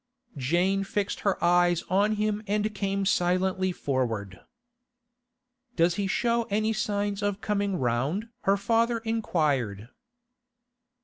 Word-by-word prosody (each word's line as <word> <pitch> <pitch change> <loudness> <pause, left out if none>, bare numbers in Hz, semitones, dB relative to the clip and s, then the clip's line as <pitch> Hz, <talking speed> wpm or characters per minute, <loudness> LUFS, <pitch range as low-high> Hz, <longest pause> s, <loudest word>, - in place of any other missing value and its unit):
Jane 175 +9 +1
fixed 200 +1 -2
her 200 -2 0
eyes 175 0 +3
on 200 +4 +2
him 210 0 -1
and 210 +1 0
came 195 -1 -1
silently 185 0 +1
forward. 115 - -2 1.4
'Does 170 0 +3
he 195 +2 -1
show 235 +3 0
any 215 +2 +1
signs 205 -1 -1
of 205 -1 -1
coming 200 -2 -1
round?' 135 - -1 0.2
her 195 +1 +4
father 230 +3 +1
inquired. 145 - -1
195 Hz, 115 wpm, -27 LUFS, 170-210 Hz, 1.4 s, her